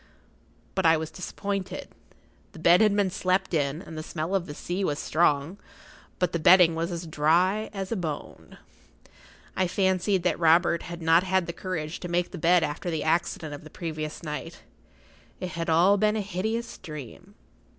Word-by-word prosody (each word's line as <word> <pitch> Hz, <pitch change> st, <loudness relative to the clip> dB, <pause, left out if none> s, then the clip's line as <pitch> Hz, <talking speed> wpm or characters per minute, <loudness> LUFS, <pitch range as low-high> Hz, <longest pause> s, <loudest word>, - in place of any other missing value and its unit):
But 190 Hz, -, -1 dB
I 165 Hz, -1 st, +5 dB
was 155 Hz, 0 st, -5 dB
disappointed. 195 Hz, +1 st, -5 dB, 0.6 s
The -, -, -12 dB
bed 170 Hz, +3 st, +5 dB
had 210 Hz, -2 st, +4 dB
been 200 Hz, -2 st, +1 dB
slept 185 Hz, 0 st, 0 dB
in, 150 Hz, +2 st, 0 dB
and 160 Hz, -, -10 dB
the 155 Hz, -, -4 dB
smell 160 Hz, +3 st, -4 dB
of 190 Hz, -3 st, 0 dB
the 145 Hz, -, -7 dB
sea 180 Hz, +5 st, -3 dB
was 145 Hz, -6 st, 0 dB
strong; 155 Hz, +3 st, +1 dB, 0.6 s
but 180 Hz, -2 st, 0 dB
the 170 Hz, -, 0 dB
bedding 175 Hz, +1 st, +7 dB
was 165 Hz, +2 st, -2 dB
as 170 Hz, 0 st, -4 dB
dry 170 Hz, +7 st, +2 dB
as 195 Hz, -1 st, -5 dB
a -, -, +1 dB
bone. 160 Hz, -7 st, -6 dB, 1.0 s
I 185 Hz, -, +1 dB
fancied 190 Hz, 0 st, +1 dB
that 180 Hz, -, 0 dB
Robert 170 Hz, 0 st, +4 dB
had 170 Hz, -1 st, -8 dB
not 165 Hz, +1 st, +5 dB
had 190 Hz, -1 st, +1 dB
the 170 Hz, -, -5 dB
courage 165 Hz, -4 st, -4 dB
to 180 Hz, -, -6 dB
make 175 Hz, 0 st, -1 dB
the 180 Hz, -, -7 dB
bed 170 Hz, +2 st, +4 dB
after 150 Hz, +4 st, -3 dB
the 160 Hz, -2 st, -2 dB
accident 160 Hz, -1 st, -1 dB
of 145 Hz, -, -9 dB
the 155 Hz, -, -11 dB
previous 155 Hz, -2 st, -5 dB
night—it 165 Hz, +3 st, -10 dB
had 165 Hz, 0 st, -4 dB
all 175 Hz, +5 st, +5 dB
been 210 Hz, +1 st, +2 dB
a 215 Hz, -, 0 dB
hideous 220 Hz, +4 st, -3 dB
dream. 160 Hz, -, -10 dB
175 Hz, 180 wpm, -26 LUFS, 160-190 Hz, 1.0 s, bedding